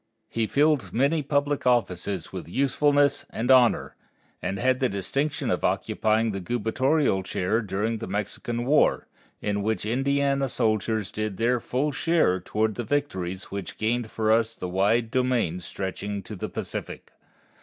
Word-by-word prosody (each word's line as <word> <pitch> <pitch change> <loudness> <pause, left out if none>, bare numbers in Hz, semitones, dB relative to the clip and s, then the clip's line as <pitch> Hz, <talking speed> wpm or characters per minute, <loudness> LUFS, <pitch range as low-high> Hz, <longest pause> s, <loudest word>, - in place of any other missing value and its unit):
He 115 -1 -1
filled 150 0 +2
many 140 +6 +2
public 145 -1 0
offices 100 -6 0
with - - -6
usefulness 140 - +2
and 120 +4 0
honor, 125 -3 +4 0.5
and 95 - -2
had 130 +4 +2
the 130 - +2
distinction 135 +10 -1
of - - -1
occupying 110 +1 +1
the 100 - -3
gubernatorial 120 - +1
chair 95 +4 -1
during 110 +2 -2
the - - -5
Mexican 115 +3 -3
War, 145 +4 +3 0.4
in 105 -1 0
which 110 +1 -1
Indiana 140 +3 +1
soldiers 110 -3 0
did 110 -3 -3
their 120 +2 +2
full 135 +6 -1
share 145 - +2
toward 110 +4 -1
the 120 - -4
victories 95 -9 -2
which 100 -3 -5
gained 115 +1 0
for 110 0 0
us 115 0 +2
the 90 - -5
wide 105 +6 +1
domain 125 -9 +1
stretching 95 +3 -5
to 105 - -8
the 90 - -5
Pacific. - - -6
115 Hz, 150 wpm, -26 LUFS, 100-135 Hz, 0.5 s, honor